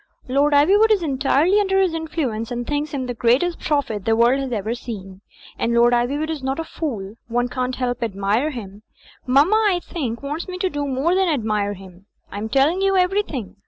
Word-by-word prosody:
Lord 280 +3 +2
Ivywood 400 +10 +5
is 415 -5 +3
entirely 290 +6 +2
under 385 -1 +2
his 375 -3 +2
influence 295 -9 -3
and 240 0 -4
thinks 295 +3 -2
him 275 -3 -3
the 245 - -3
greatest 250 +10 +1
prophet 275 - -1
the 225 +2 +2
world 240 +4 +3
has 270 -2 -4
ever 220 0 -2
seen. 195 -6 -8 0.4
And 235 0 0
Lord 240 +1 +5
Ivywood 280 +6 0
is 310 -3 -4
not 265 +1 -2
a 325 - -2
fool; 225 - -5
one 245 +1 0
can't 255 0 -2
help 245 -1 -2
admirJ% 220 +6 -1
him. 205 -4 -8 0.5
Mamma, 285 +11 +4
I 360 -2 +1
think, 265 -9 -5
wants 300 +6 -4
me 365 -1 -5
to 370 0 -1
do 290 -1 -3
more 275 +6 0
than 380 -1 +2
admire 215 -7 -1
him. 190 0 -15 0.2
I 205 - -5
am 220 +1 -4
telling 285 - +2
you 390 0 +2
everything. 360 - -1
265 Hz, 200 wpm, -21 LUFS, 230-320 Hz, 0.5 s, Ivywood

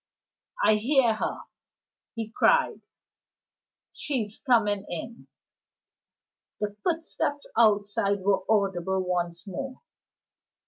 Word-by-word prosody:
"I 215 - +5
hear 245 +1 +3
her," 215 - -3 0.7
he 225 -1 -4
cried, 485 - +3 1.1
"She's 225 -8 -2
coming 210 -7 +2
in!" 230 +7 -7 1.3
The 210 -1 -3
footsteps 320 -4 -1
outside 205 -2 +3
were 195 0 +2
audible 190 -3 +1
once 175 -1 -2
more. 260 - -6
210 Hz, 85 wpm, -27 LUFS, 195-245 Hz, 1.3 s, I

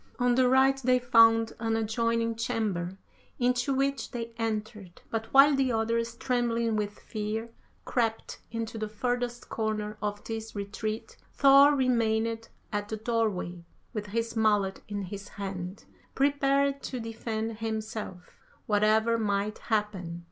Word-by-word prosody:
On 245 0 +3
the 255 0 +4
right 265 +1 +4
they 255 0 +4
found 225 -2 +5
an 225 -1 0
adjoining 230 +1 0
chamber, 210 -6 -2 0.4
into 245 +1 +1
which 275 +1 0
they 230 -1 -5
entered, 215 -4 -4
but 225 0 -3
while 275 +1 +7
the 265 -2 +2
others, 230 +1 0
trembling 235 -3 0
with 205 -1 -2
fear, 220 +1 -4 0.3
crept 225 -3 -1
into 225 -1 -4
the 215 - -2
furthest 245 +2 -2
corner 215 -1 -2
of 205 -1 -3
this 225 -1 -6
retreat, 215 - -4 0.2
Thor 280 +1 +7
remained 230 -3 +1 0.2
at 205 0 -2
the 220 - -3
doorway 215 -6 -1 0.3
with 210 -2 -4
his 230 +3 -2
mallet 210 -3 +2
in 205 -1 -3
his 200 +2 -7
hand, 190 -1 -6 0.3
prepared 280 0 +2
to 255 - -5
defend 225 -1 -4
himself, 215 -4 -5 0.3
whatever 220 +2 +3
might 205 -1 -1
happen. 205 -6 -2
225 Hz, 135 wpm, -28 LUFS, 210-240 Hz, 0.4 s, while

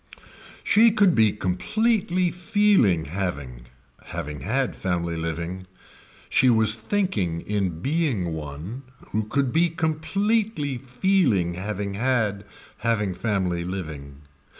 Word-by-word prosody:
She 230 +1 +6
could 205 -5 +4
be 110 -2 +4
completely 185 - 0
feeling 180 - +3
having, 70 -9 -4 0.4
having 75 0 -5
had 125 - -1
family 85 -2 -2
living. 85 +3 -4 0.6
She 130 - +4
was 110 -2 +5
thinking 110 - -1
in 95 -5 -2
being 135 - 0
one 80 - -6 0.3
who 110 0 -1
could 135 +3 0
be 170 +2 +3
completely 165 - -1
feeling 125 - +1
having 100 +2 -4
had, 110 -3 0 0.3
having 105 -5 0
family 90 -4 -1
living. 75 -7 -6
105 Hz, 105 wpm, -24 LUFS, -, 0.6 s, She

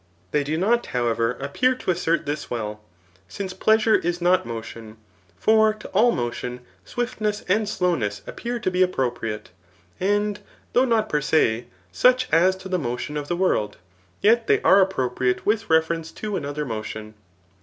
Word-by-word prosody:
They 150 - +1
do 155 +3 -2
not, 230 +7 +2
however, 115 0 0
ap 140 +1 -6
pear 255 0 +3
to 220 - -1
assert 170 -2 0
this 145 +1 -4
well, 105 -3 -4 0.5
since 185 - -5
pleasure 220 +3 +3
is 175 -2 +1
not 175 -6 +2
motion. 115 -1 -8 0.4
For 220 - +4
to 215 - -10
all 225 +5 +4
motion 125 - -4 0.2
swiftness 215 - -2
and 205 +3 +1
slowness 130 - -1
appear 240 0 -4
to 185 - 0
be 180 - -2
appro 135 -10 +1
priate, 110 -3 -5 0.5
and 205 +2 0 0.3
though 255 - +4
not 225 -3 +1
per 150 -7 0
se, 120 -6 +1 0.2
such 255 - +3
as 180 +3 +5
to 190 0 -9
the 185 -1 0
motion 125 +2 -4
of 145 -1 -3
the 175 - -1
world, 175 - 0 0.2
* 90 -1 -36
yet 230 +2 +4
they - - +4
are 195 - +6
appropriate 130 -9 0
with 220 +1 0
reference 160 0 +1
to 210 -2 -4
another 145 0 -3
motion. 110 -2 -6
170 Hz, 170 wpm, -23 LUFS, -, 0.5 s, are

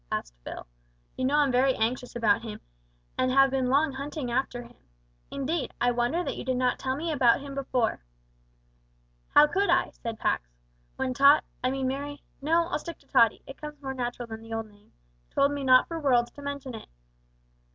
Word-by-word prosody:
asked - - -3
Phil. - - -7 0.5
"You 255 - -2
know 275 +3 +2
I'm 290 -2 +3
very 260 +1 +3
anxious 245 +3 -2
about 220 -2 +3
him, 220 -2 -7 0.6
and 255 - +2
have 270 0 +5
long 270 +4 +2
been - - -6
hunting 280 -2 -4
after 245 -1 -1
him. 240 +1 -15 0.6
Indeed, 280 +3 -3
I 245 - +3
wonder 245 +9 0
that - - -3
you - - -6
did 255 0 -1
not 250 -1 +1
tell 260 0 -1
me 325 +3 -3
about 250 -6 +4
him 280 0 -8
before." 255 - -1 1.3
"How 295 - +9
could 390 +7 0
I," - - +3
said 230 -2 -6
Pax, - - -1 0.5
"when 260 -1 -2
Tot 280 +3 +6 0.2
I 255 - +2
mean 265 0 -1
Merry 285 +2 -4 0.2
no, 330 +4 +2
I'll - - -1
stick 335 +2 -8
to - - -26
Tottie 230 -5 +3
it 270 - -11
comes 300 -1 -7
more 270 -2 -5
natural 245 -1 -4
than 220 0 -8
the 225 0 -9
old 225 0 -3
name 205 0 -24 0.4
told 280 +1 +2
me 285 -1 -3
not 255 -1 +6
for 330 -1 -4
worlds 245 -5 +2
to 285 - -12
mention 280 -2 -5
it. 220 - -9
265 Hz, 200 wpm, -27 LUFS, 240-285 Hz, 1.3 s, How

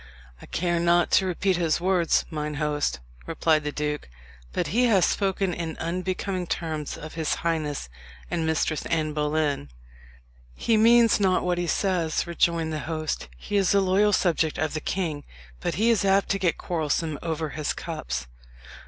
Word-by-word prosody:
"I - - -12
care 175 0 0
not 170 0 +3
to 190 - +4
repeat 185 +1 +1
his 165 -2 +1
words, 180 -2 +2
mine 150 -1 -3
host," 150 - -1 0.3
replied 160 -1 +2
the 150 - -2
duke; 150 - -3 0.4
"but - - -1
he 245 +3 +4
hath 200 -7 +4
spoken 195 -2 0
in 165 -2 -4
unbecoming 185 +2 -2
terms 155 -4 -3
of 155 - -9
his 160 -2 -1
highness 155 - -1 0.4
and 170 -2 0
Mistress 160 -1 0
Anne 155 -2 0
Boleyn." 150 - 0 0.9
"He 230 - +1
means 230 +1 +5
not 190 -2 +2
what 180 -1 0
he 175 - -1
says," 170 -2 0
rejoined 170 -2 +1
the 155 - -2
host. 155 - -3
"He 205 - -2
is 195 0 +3
a - - +6
loyal 195 +2 +3
subject 165 -5 +1
of 155 +1 -1
the 155 - -3
king; 160 -6 -2 0.4
but - - -2
he 225 +4 +3
is 220 -3 +2
apt 195 0 +3
to 195 - +1
get 180 -3 +1
quarrelsome 155 -2 -1
over 160 -2 -2
his 150 0 -2
cups." 65 +1 -4
165 Hz, 170 wpm, -26 LUFS, 155-185 Hz, 0.9 s, a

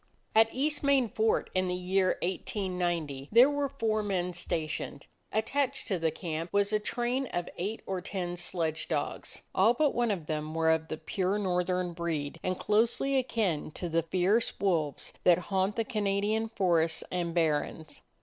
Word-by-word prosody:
At 225 0 +6
East 290 +3 0
Main 275 -3 +3
Fort 220 +1 +1
in 185 0 +1
the 180 - -1
year 185 +1 +1
189 175 -6 -2
there 245 +6 +7
were 285 -1 0
four 225 -5 0
men 180 -3 -1
stationed. 155 -4 -3 0.3
Attached 270 +5 0
to 190 -4 0
the 165 0 +2
camp 165 +1 -4
was 200 +1 +2
a 215 - +3
train 245 +5 -1
of 175 -5 -3
eight 205 +5 -4
or 190 -1 -3
ten 180 -2 -3
sledge 165 -3 -1
dogs; 150 -3 -3
all 220 +6 +4
but 295 +1 +2
one 240 -1 +1
of 185 -7 -2
them 155 0 -3
were 160 0 +3
of 160 0 +1
the 155 - -4
pure 190 +4 -1
northern 180 -2 0
breed 165 -3 -3
and 185 0 -1
closely 230 +6 +2
akin 220 - 0
to 175 - -4
the 165 +1 +2
fierce 185 +7 +1
wolves 165 -7 0
that 175 -2 +6
haunt 190 +2 0
the 225 - 0
Canadian 215 0 0
forests 170 -7 +1
and 175 -2 -2
barrens. 155 -1 -1
185 Hz, 170 wpm, -30 LUFS, 165-220 Hz, 0.3 s, there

